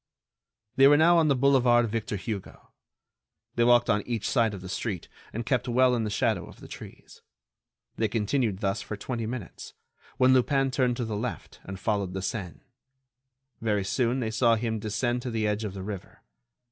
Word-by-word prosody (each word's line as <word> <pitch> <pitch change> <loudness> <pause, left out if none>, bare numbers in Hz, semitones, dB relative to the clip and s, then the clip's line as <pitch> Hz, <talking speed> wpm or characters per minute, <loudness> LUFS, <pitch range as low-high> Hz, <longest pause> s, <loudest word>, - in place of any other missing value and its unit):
They 135 +1 +8
were 145 +1 +6
now 170 +2 +5
on 160 - +3
the 140 - +3
Boulevard 125 -3 +4
Victor 110 -1 -3
Hugo. 100 -1 -7 0.8
They 120 - +2
walked 120 0 +5
one 105 -3 +2
on - - -19
each 115 -4 -2
side 115 -5 +1
of 95 - -9
the 95 - -8
street, 95 -1 -4 0.2
and 115 +1 -4
kept 125 0 0
well 125 +1 +3
in 115 -2 0
the - - -2
shadow 105 -3 0
of - - -14
the - - -11
trees. - - -12 0.8
They 110 - +1
continued 110 -1 -1
thus 100 0 -1
for 105 - -6
twenty 115 +1 -4
minutes, 115 -6 -7 0.4
when 130 0 +5
Lupin 135 +1 +2
turned 125 -1 +1
to 120 - -2
the 110 -1 -4
left 115 +4 -5
and 95 0 -7
followed 100 -3 -1
the 95 -1 -4
Seine. 95 -3 -5 1.0
Very 105 -3 0
soon 125 +4 0
they 110 -2 -2
saw 115 +1 +3
him 110 -1 -2
descend 120 +4 -1
to 125 - -4
the 110 -2 -1
edge 105 +1 -1
of 100 -2 -5
the 95 - -6
river. 100 -2 -8
115 Hz, 195 wpm, -27 LUFS, 105-125 Hz, 1.0 s, They